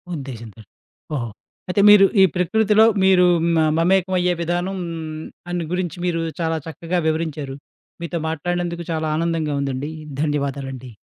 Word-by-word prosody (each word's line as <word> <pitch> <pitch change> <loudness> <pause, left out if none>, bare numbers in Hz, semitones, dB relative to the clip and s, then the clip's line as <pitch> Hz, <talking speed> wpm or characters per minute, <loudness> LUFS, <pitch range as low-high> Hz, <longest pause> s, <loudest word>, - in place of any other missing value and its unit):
ఉద్దేశంతోటి, 115 -7 -9 0.5
ఓహో! 120 -4 -2 0.4
అయితే 190 +2 +2
మీరు 205 -1 +8 0.2
ఈ - - +9
ప్రకృతిలో 215 +4 +3 0.2
మీరు 190 -1 +5 0.2
హ్మ్. 170 -1 +2
ఆహ్, 155 - +2
మమేకమయ్యే 180 0 +2
విధానం 175 +3 -1 0.7
అని 175 -1 -2
గురించి 180 -2 -2
మీరు 170 -2 0 0.2
చాలా 165 -1 0
చక్కగా 165 +3 -2
వివరించారు. 155 -4 -2 0.5
మీతో 170 0 -3
మాట్లాడినందుకు 170 +2 -3
చాలా 160 -1 -1
ఆనందంగా 165 -3 -1
ఉందండి. 140 +2 -3 0.3
ధన్యవాదాలండి. 140 -4 -3
165 Hz, 125 wpm, -21 LUFS, 145-180 Hz, 0.7 s, ఈ